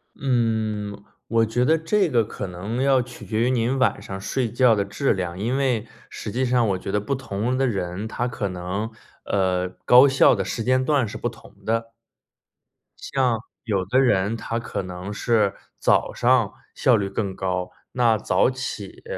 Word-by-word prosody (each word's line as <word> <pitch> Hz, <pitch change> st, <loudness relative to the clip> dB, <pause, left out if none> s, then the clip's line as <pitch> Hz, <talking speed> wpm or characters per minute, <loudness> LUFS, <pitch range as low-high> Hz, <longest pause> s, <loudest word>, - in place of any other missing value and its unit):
嗯， 110 Hz, -6 st, -1 dB, 0.2 s
我 115 Hz, 0 st, +3 dB
觉 120 Hz, +3 st, 0 dB
得 160 Hz, -, +4 dB
这 190 Hz, +5 st, +1 dB
个 120 Hz, -4 st, +3 dB
可 100 Hz, -, -6 dB
能 100 Hz, +7 st, -4 dB
要 135 Hz, -2 st, +4 dB
取 125 Hz, 0 st, -10 dB
决 110 Hz, 0 st, -1 dB
于 125 Hz, -, +3 dB
您 125 Hz, +2 st, +1 dB
晚 130 Hz, -, +2 dB
上 95 Hz, 0 st, -6 dB
睡 120 Hz, +2 st, -1 dB
觉 120 Hz, -1 st, +4 dB
的 100 Hz, -1 st, 0 dB
质 105 Hz, +7 st, 0 dB
量， 90 Hz, -2 st, -4 dB
因 120 Hz, +6 st, 0 dB
为 130 Hz, -6 st, 0 dB, 0.2 s
实 -, -, -6 dB
际 130 Hz, +2 st, 0 dB
上 125 Hz, -2 st, +2 dB
我 95 Hz, -, +1 dB
觉 95 Hz, -, -5 dB
得 105 Hz, -, +1 dB
不 135 Hz, +7 st, -2 dB
同 125 Hz, -1 st, -2 dB
的 135 Hz, -, +2 dB
人， 100 Hz, -3 st, -2 dB
他 120 Hz, +2 st, -2 dB
可 110 Hz, -4 st, -3 dB
能 90 Hz, +5 st, -4 dB, 0.3 s
呃， 90 Hz, -2 st, +1 dB, 0.2 s
高 125 Hz, +3 st, +8 dB
效 135 Hz, -1 st, +5 dB
的 -, -, -2 dB
时 115 Hz, -, -3 dB
间 130 Hz, +2 st, +2 dB
段 140 Hz, -5 st, +2 dB
是 105 Hz, -, -6 dB
不 -, -, -2 dB
同 110 Hz, -3 st, -12 dB
的。 115 Hz, +1 st, -1 dB, 1.1 s
像 125 Hz, -4 st, 0 dB, 0.2 s
有 100 Hz, -5 st, -1 dB
的 125 Hz, +7 st, +2 dB
人， 105 Hz, -4 st, +2 dB
它 115 Hz, +1 st, -3 dB
可 115 Hz, -, -4 dB
能 90 Hz, +2 st, -6 dB
是 105 Hz, -2 st, +1 dB, 0.2 s
早 -, -, +2 dB
上 120 Hz, -3 st, +2 dB, 0.2 s
效 125 Hz, -, +4 dB
率 100 Hz, -3 st, -1 dB
更 100 Hz, -1 st, -3 dB
高， 90 Hz, -1 st, -2 dB, 0.2 s
那 115 Hz, -3 st, +3 dB
早 110 Hz, -, +2 dB
起 120 Hz, -6 st, -6 dB
115 Hz, 195 characters per minute, -23 LUFS, 100-125 Hz, 1.1 s, 高